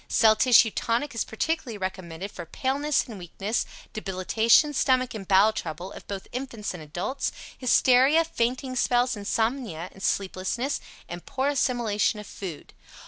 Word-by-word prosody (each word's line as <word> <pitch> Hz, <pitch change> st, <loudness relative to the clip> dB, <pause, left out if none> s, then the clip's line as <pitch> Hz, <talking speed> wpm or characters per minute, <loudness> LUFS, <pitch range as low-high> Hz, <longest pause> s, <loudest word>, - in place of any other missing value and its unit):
Cell 220 Hz, -1 st, +5 dB
Tissue 235 Hz, -1 st, +6 dB
Tonic 240 Hz, +8 st, -1 dB
is 230 Hz, -, -1 dB
particularly 250 Hz, -1 st, -2 dB
recommended 185 Hz, -1 st, -5 dB
for 175 Hz, -, -8 dB
Paleness 280 Hz, -, 0 dB
and 220 Hz, -5 st, -8 dB
Weakness, 195 Hz, +5 st, -3 dB, 0.3 s
Debilitation, 220 Hz, +8 st, +3 dB
Stomach 255 Hz, -2 st, +2 dB
and 200 Hz, -4 st, -7 dB
Bowel 200 Hz, +3 st, +5 dB
Trouble 175 Hz, +2 st, -5 dB
(of -, -, -11 dB
both 195 Hz, -1 st, -6 dB
infants 240 Hz, -6 st, -4 dB
and 180 Hz, -, -8 dB
adults), 175 Hz, -, -3 dB, 0.2 s
Hysteria, 260 Hz, +4 st, +4 dB
Fainting 255 Hz, -2 st, -2 dB
Spells, 245 Hz, 0 st, +2 dB
Insomnia 210 Hz, -, -2 dB
(sleeplessness) 195 Hz, +8 st, -1 dB, 0.3 s
and 175 Hz, 0 st, -7 dB
Poor 270 Hz, +2 st, 0 dB
Assimilation 240 Hz, -6 st, +1 dB
of 210 Hz, -, -8 dB
Food. 180 Hz, -7 st, -8 dB
225 Hz, 140 wpm, -26 LUFS, 190-255 Hz, 0.3 s, Tissue